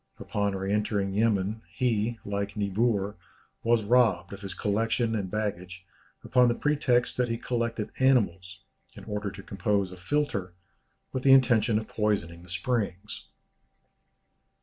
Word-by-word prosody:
Upon 100 Hz, -1 st, -2 dB
re 95 Hz, +1 st, -2 dB
entering 105 Hz, -2 st, 0 dB
Yemen, 105 Hz, 0 st, +1 dB
he, 115 Hz, -2 st, 0 dB
like 100 Hz, 0 st, -3 dB
Niebuhr, 105 Hz, 0 st, 0 dB, 0.5 s
was 115 Hz, -1 st, +2 dB
robbed 105 Hz, -6 st, +3 dB
of 100 Hz, -, -9 dB
his 95 Hz, -3 st, -6 dB
collections 115 Hz, +2 st, 0 dB
and 100 Hz, -4 st, -2 dB
baggage, 95 Hz, -2 st, -4 dB, 0.4 s
upon 125 Hz, -1 st, +4 dB
the 120 Hz, -, +2 dB
pretext 140 Hz, -4 st, +1 dB
that 125 Hz, -1 st, +1 dB
he 115 Hz, -, -1 dB
collected 115 Hz, -2 st, -2 dB
animals, 100 Hz, -9 st, +1 dB, 0.3 s
in -, -, -11 dB
order 105 Hz, -1 st, -3 dB
to 95 Hz, -, -10 dB
compose 100 Hz, 0 st, -1 dB
a 90 Hz, -, -10 dB
philtre, 100 Hz, -4 st, -1 dB, 0.6 s
with 130 Hz, -, -1 dB
the 135 Hz, 0 st, +6 dB
intention 115 Hz, -4 st, +4 dB
of 110 Hz, 0 st, -3 dB
poisoning 100 Hz, -6 st, -1 dB
the 90 Hz, -, -15 dB
springs. 105 Hz, -1 st, -3 dB
105 Hz, 140 wpm, -28 LUFS, 95-120 Hz, 0.6 s, the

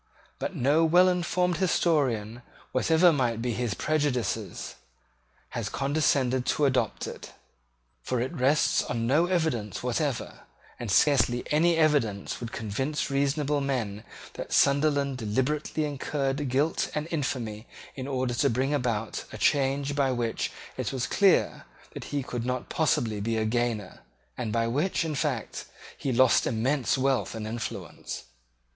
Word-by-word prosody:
But -, -, -3 dB
no 145 Hz, +6 st, +3 dB
well 175 Hz, +3 st, +5 dB
informed 180 Hz, 0 st, +1 dB
historian, 130 Hz, -, +1 dB, 0.3 s
whatever 160 Hz, +6 st, +4 dB
might 120 Hz, -5 st, 0 dB
be 120 Hz, 0 st, -1 dB
his 115 Hz, -2 st, -2 dB
prejudices, 145 Hz, -6 st, -1 dB, 0.8 s
has 115 Hz, -3 st, -3 dB
condescended 135 Hz, -2 st, +1 dB
to 150 Hz, -, +2 dB
adopt 130 Hz, -2 st, 0 dB
it: -, -, -8 dB, 0.7 s
for 125 Hz, -, -2 dB
it 130 Hz, +7 st, -2 dB
rests 140 Hz, 0 st, +2 dB
on 115 Hz, -1 st, -2 dB
no 150 Hz, +8 st, +3 dB
evidence 125 Hz, -, -1 dB
whatever; 125 Hz, +1 st, -2 dB, 0.4 s
and 120 Hz, -, -5 dB
scarcely 125 Hz, +3 st, +3 dB
any 165 Hz, +3 st, +3 dB
evidence 140 Hz, -, +1 dB
would 120 Hz, -1 st, -6 dB
convince 135 Hz, +8 st, -2 dB
reasonable 140 Hz, +1 st, +1 dB
men 115 Hz, -7 st, -2 dB, 0.3 s
that -, -, -7 dB
Sunderland 140 Hz, -1 st, +3 dB
deliberately 130 Hz, +8 st, -1 dB
incurred 140 Hz, -1 st, -2 dB
guilt 140 Hz, +6 st, +1 dB
and 150 Hz, +1 st, -2 dB
infamy 120 Hz, -8 st, -3 dB, 0.3 s
in 130 Hz, -1 st, -5 dB
order 130 Hz, -2 st, -1 dB
to -, -, +2 dB
bring 130 Hz, +5 st, 0 dB
about 115 Hz, -6 st, -2 dB
a -, -, -7 dB
change 140 Hz, 0 st, +1 dB
by 140 Hz, -2 st, +2 dB
which 120 Hz, -2 st, -1 dB, 0.3 s
it -, -, -2 dB
was 130 Hz, -2 st, -2 dB
clear 195 Hz, -2 st, +2 dB, 0.3 s
that -, -, -7 dB
he 145 Hz, -2 st, -2 dB
could 120 Hz, -2 st, -4 dB
not 125 Hz, 0 st, -3 dB
possibly 115 Hz, -9 st, +1 dB
be 115 Hz, +2 st, -1 dB
a 110 Hz, -, 0 dB
gainer, 115 Hz, -3 st, -1 dB, 0.4 s
and 115 Hz, -4 st, -3 dB
by 115 Hz, +1 st, +1 dB
which, 150 Hz, +9 st, 0 dB
in 160 Hz, -, -2 dB
fact, 135 Hz, -6 st, -2 dB, 0.3 s
he 135 Hz, -, -3 dB
lost 130 Hz, 0 st, +4 dB
immense 130 Hz, +5 st, +1 dB
wealth 135 Hz, -3 st, 0 dB
and 110 Hz, -1 st, -5 dB
influence. 115 Hz, +1 st, -6 dB
135 Hz, 140 wpm, -27 LUFS, 120-150 Hz, 0.8 s, well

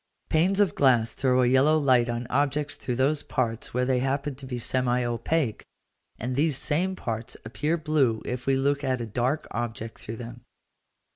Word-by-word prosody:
Panes 180 Hz, +5 st, +2 dB
of 205 Hz, -2 st, +3 dB
glass 120 Hz, -5 st, +3 dB
throw 130 Hz, -1 st, +2 dB
a -, -, +3 dB
yellow 135 Hz, +5 st, +4 dB
light 130 Hz, -5 st, +3 dB
on 120 Hz, +1 st, -2 dB
objects 145 Hz, +2 st, 0 dB
through 125 Hz, -, -4 dB
those 140 Hz, +4 st, +1 dB
parts 115 Hz, -4 st, -2 dB
where 125 Hz, +1 st, 0 dB
they 130 Hz, -1 st, +2 dB
happen 135 Hz, +2 st, -1 dB
to 135 Hz, 0 st, -11 dB
be 125 Hz, -1 st, -4 dB
semi 125 Hz, 0 st, +1 dB
opaque, 120 Hz, +1 st, -1 dB, 0.5 s
and 125 Hz, +2 st, -3 dB
these 150 Hz, 0 st, +1 dB
same 175 Hz, +7 st, 0 dB
parts 115 Hz, -7 st, -5 dB
appear 145 Hz, +9 st, -1 dB
blue 145 Hz, -8 st, +1 dB
if 125 Hz, +1 st, -4 dB
we 135 Hz, -, +4 dB
look 140 Hz, +2 st, +1 dB
at 130 Hz, -2 st, 0 dB
a 120 Hz, -, -3 dB
dark 125 Hz, +7 st, -1 dB
object 115 Hz, -1 st, -4 dB
through 110 Hz, +1 st, -6 dB
them. 120 Hz, +1 st, -8 dB
130 Hz, 185 wpm, -26 LUFS, 120-145 Hz, 0.5 s, yellow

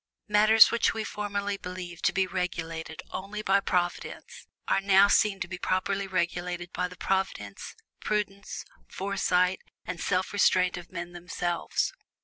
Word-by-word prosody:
Matters 215 Hz, +1 st, +7 dB
which 235 Hz, -, +2 dB
we 220 Hz, -, -2 dB
formerly 205 Hz, -1 st, -3 dB
believed 180 Hz, -2 st, -7 dB
to -, -, +5 dB
be 190 Hz, -1 st, +2 dB
regulated 165 Hz, -3 st, -4 dB
only 205 Hz, +3 st, -5 dB
by 195 Hz, 0 st, +4 dB
Providence, 175 Hz, -2 st, -3 dB, 0.2 s
are -, -, +2 dB
now 195 Hz, 0 st, +6 dB
seen 200 Hz, -1 st, +3 dB
to -, -, -2 dB
be 180 Hz, 0 st, -6 dB
properly 195 Hz, +2 st, 0 dB
regulated 175 Hz, -1 st, -2 dB
by 180 Hz, -, -1 dB
the 180 Hz, -, -12 dB
providence, 190 Hz, -, -2 dB, 0.2 s
prudence, 200 Hz, -1 st, -3 dB, 0.2 s
foresight, 185 Hz, -2 st, +1 dB, 0.3 s
and 180 Hz, -2 st, -5 dB
self 185 Hz, +1 st, 0 dB
restraint 185 Hz, -2 st, +3 dB
of 175 Hz, -1 st, -9 dB
men 175 Hz, -1 st, -5 dB
themselves. 175 Hz, -, -2 dB
185 Hz, 140 wpm, -28 LUFS, 175-200 Hz, 0.3 s, Matters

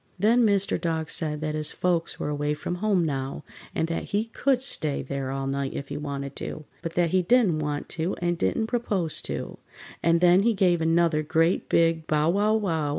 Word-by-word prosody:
Then 225 Hz, +6 st, +4 dB
Mr. 200 Hz, -1 st, +1 dB
Dog 160 Hz, -2 st, -2 dB
said 150 Hz, -2 st, -2 dB
that 155 Hz, -1 st, -2 dB
his 155 Hz, 0 st, -2 dB
folks 175 Hz, -2 st, -1 dB
were -, -, -2 dB
away 145 Hz, 0 st, -1 dB
from 155 Hz, +3 st, -4 dB
home 200 Hz, -5 st, +2 dB
now, 135 Hz, -1 st, -3 dB, 0.3 s
and 160 Hz, -, 0 dB
that 165 Hz, -, -3 dB
he 210 Hz, +2 st, -1 dB
could 255 Hz, +3 st, +1 dB
stay 155 Hz, -, -1 dB
there 135 Hz, 0 st, -4 dB
all 135 Hz, 0 st, -3 dB
night 135 Hz, 0 st, -2 dB
if 140 Hz, -, -5 dB
he 145 Hz, -, -4 dB
wanted 140 Hz, -2 st, -5 dB
to, 155 Hz, -, -6 dB, 0.2 s
but 165 Hz, 0 st, -5 dB
that 175 Hz, -2 st, +2 dB
he 185 Hz, -, +3 dB
didn't 195 Hz, -5 st, +3 dB
want 150 Hz, -1 st, -3 dB
to 165 Hz, +3 st, -2 dB
and 175 Hz, 0 st, -1 dB
didn't 130 Hz, -, 0 dB
propose 200 Hz, -9 st, -1 dB
to, -, -, -5 dB, 0.4 s
and 170 Hz, 0 st, +3 dB
then 180 Hz, +2 st, +5 dB
he 225 Hz, +1 st, +2 dB
gave 180 Hz, -3 st, +3 dB
another 165 Hz, -1 st, +2 dB
great 165 Hz, +3 st, +1 dB
big 165 Hz, -1 st, +2 dB
bow 150 Hz, +1 st, +2 dB
wow 210 Hz, +3 st, +2 dB
wow! 165 Hz, -9 st, 0 dB
165 Hz, 205 wpm, -26 LUFS, 150-185 Hz, 0.4 s, then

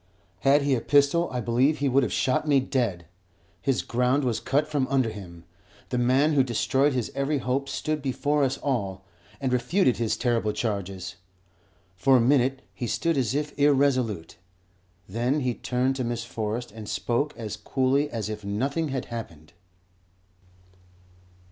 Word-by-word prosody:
Had 140 Hz, +1 st, +4 dB
he 140 Hz, -1 st, +2 dB
a 120 Hz, -, +1 dB
pistol 145 Hz, +6 st, +3 dB
I 125 Hz, -1 st, -2 dB
believe 125 Hz, +7 st, +2 dB
he 140 Hz, -, 0 dB
would 135 Hz, +1 st, +4 dB
have 125 Hz, -, -1 dB
shot 130 Hz, +4 st, +1 dB
me 140 Hz, -2 st, +5 dB
dead. 120 Hz, -10 st, -1 dB, 0.6 s
His 135 Hz, +4 st, 0 dB
ground 125 Hz, +4 st, +1 dB
was 120 Hz, -4 st, 0 dB
cut 145 Hz, +3 st, 0 dB
from 145 Hz, -4 st, 0 dB
under 130 Hz, -4 st, +1 dB
him. 85 Hz, -5 st, -10 dB, 0.5 s
The 125 Hz, -, -1 dB
man 130 Hz, +5 st, +3 dB
who 140 Hz, -, +5 dB
destroyed 135 Hz, +3 st, +1 dB
his 125 Hz, -3 st, -2 dB
every 140 Hz, +2 st, 0 dB
hope 135 Hz, +2 st, -1 dB
stood 155 Hz, -1 st, -2 dB
before 145 Hz, +2 st, 0 dB
us 135 Hz, 0 st, 0 dB
all, 100 Hz, -9 st, -2 dB, 0.3 s
and 130 Hz, -2 st, -1 dB
refuted 130 Hz, +3 st, +2 dB
his 115 Hz, -2 st, 0 dB
terrible 115 Hz, -4 st, 0 dB
charges. 95 Hz, -4 st, -3 dB, 0.8 s
For 130 Hz, +7 st, +4 dB
a -, -, +4 dB
minute 130 Hz, +1 st, +2 dB
he 120 Hz, -, -4 dB
stood 165 Hz, +7 st, 0 dB
as 130 Hz, -2 st, 0 dB
if 150 Hz, 0 st, -2 dB
irresolute; 130 Hz, -, +2 dB, 0.7 s
then 120 Hz, +8 st, 0 dB
he 125 Hz, -2 st, 0 dB
turned 130 Hz, +3 st, -1 dB
to 130 Hz, -, -1 dB
Miss 120 Hz, -1 st, -2 dB
Forrest 115 Hz, 0 st, -4 dB
and 110 Hz, -1 st, -9 dB
spoke 130 Hz, +5 st, -1 dB
as 110 Hz, -4 st, -5 dB
coolly 135 Hz, +2 st, +1 dB
as 115 Hz, -5 st, -3 dB
if 105 Hz, -1 st, -6 dB
nothing 135 Hz, +11 st, -1 dB
had 130 Hz, -3 st, -3 dB
happened. 80 Hz, -10 st, -8 dB
130 Hz, 160 wpm, -26 LUFS, 115-140 Hz, 0.8 s, me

